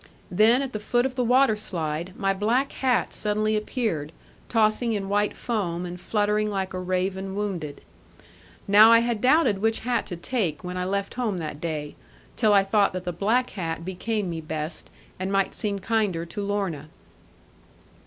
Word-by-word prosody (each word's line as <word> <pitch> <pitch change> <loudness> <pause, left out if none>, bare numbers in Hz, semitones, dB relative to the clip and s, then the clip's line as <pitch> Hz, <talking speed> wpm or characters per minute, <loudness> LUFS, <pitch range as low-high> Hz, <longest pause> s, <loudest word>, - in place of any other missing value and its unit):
Then 225 +8 +4
at 265 - -5
the 215 - -3
foot 240 +4 +1
of 265 - -1
the 255 -1 0
waterslide, 190 - +1
my 195 -2 +1
black 230 +8 +1
hat 255 -2 0
suddenly 215 +1 0
appeared, 210 - -2 0.4
tossing 225 +1 +2
in 195 -2 -3
white 205 +1 +1
foam, 180 -7 -2
and 180 0 -7
fluttering 210 +1 +1
like 195 -2 -3
a 185 - -3
raven 190 +1 -2
wounded. 185 -8 -4 0.9
Now 210 +3 +8
I 230 0 +7
had 235 -2 -1
doubted 255 -6 +4
which 225 +2 +1
hat 245 +1 -1
to 180 - -5
take, 175 - -2
when 180 0 -5
I 180 0 -2
left 200 +1 -2
home 230 -6 -1
that 155 -3 -5
day; 150 -3 -3 0.4
till 215 - +3
I 200 -1 +6
thought 200 0 +2
that 185 -1 -4
the 175 -1 -3
black 225 +8 +1 0.3
became 200 +3 -2
me 165 -1 -4
best, 155 +1 -5 0.3
and 190 +1 -2
might 195 -1 +1
seem 205 -3 0
kinder 200 -4 0
to 185 +4 -6
Lorna. 195 -7 -2
200 Hz, 170 wpm, -25 LUFS, 180-225 Hz, 0.9 s, Now